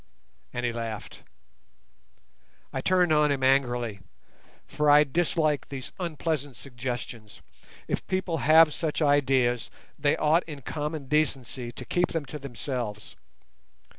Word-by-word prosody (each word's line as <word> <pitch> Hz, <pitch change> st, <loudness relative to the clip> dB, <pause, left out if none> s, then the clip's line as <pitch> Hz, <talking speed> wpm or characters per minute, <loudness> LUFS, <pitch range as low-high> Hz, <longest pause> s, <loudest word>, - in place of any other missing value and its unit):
And 120 Hz, 0 st, -3 dB
he 120 Hz, -, 0 dB
laughed. 115 Hz, -2 st, -6 dB, 1.5 s
I -, -, -2 dB
turned 180 Hz, -3 st, +3 dB
on 150 Hz, -1 st, +4 dB
him 135 Hz, -2 st, -1 dB
angrily, 120 Hz, -5 st, +2 dB, 0.7 s
for 150 Hz, +1 st, 0 dB
I 145 Hz, +1 st, +8 dB
dislike 155 Hz, -1 st, 0 dB
these 135 Hz, -2 st, -6 dB
unpleasant 155 Hz, -5 st, -3 dB
suggestions. 120 Hz, -4 st, -6 dB, 0.5 s
If -, -, -3 dB
people 185 Hz, -3 st, -1 dB
have 155 Hz, +1 st, +6 dB
such 160 Hz, 0 st, -1 dB
ideas, 130 Hz, -5 st, +2 dB, 0.3 s
they 145 Hz, 0 st, +2 dB
ought 155 Hz, +3 st, +3 dB
in 145 Hz, -4 st, -8 dB
common 150 Hz, 0 st, -4 dB
decency 135 Hz, -5 st, -1 dB
to 125 Hz, -, -8 dB
keep 175 Hz, +6 st, 0 dB
them 165 Hz, -3 st, -2 dB
to 150 Hz, -, -7 dB
themselves. 120 Hz, -5 st, -5 dB
140 Hz, 125 wpm, -27 LUFS, 125-155 Hz, 1.5 s, I